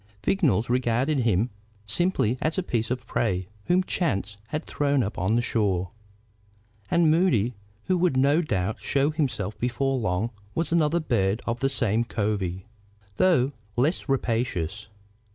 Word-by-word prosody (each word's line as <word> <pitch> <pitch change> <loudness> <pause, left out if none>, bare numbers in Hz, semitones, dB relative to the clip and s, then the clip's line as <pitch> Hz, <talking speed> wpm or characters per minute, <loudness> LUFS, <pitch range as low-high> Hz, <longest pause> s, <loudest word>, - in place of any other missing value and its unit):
Vignolles 135 - +2
regarded 125 +4 +1
him 115 -1 +1 0.3
simply 125 - +1
as 155 +3 0
a 190 - +1
piece 115 -9 -1
of 125 -1 -3
prey 95 -6 -1 0.2
whom 180 +1 +3
chance 105 - -1
had 150 +7 -4
thrown 140 -2 +1
up 105 - -4
on 95 +6 +1
the 120 - +2
shore. 95 -6 0 1.0
And 170 -2 +4
Moody, 130 - +2 0.3
who 185 -1 +1
would 170 -7 +2
no 140 +5 +4
doubt 105 - -2
show 140 +2 +1
himself 120 -10 -2
before 130 +2 0
long, 105 +2 -1 0.2
was 165 -1 -1
another 165 0 +3
bird 110 - 0
of 120 0 -2
the 135 - +1
same 115 -4 +1
covey, 100 -5 -2 0.5
though 145 -8 +3 0.2
less 145 +5 0
rapacious. 110 -7 -1
120 Hz, 145 wpm, -26 LUFS, 105-150 Hz, 1.0 s, And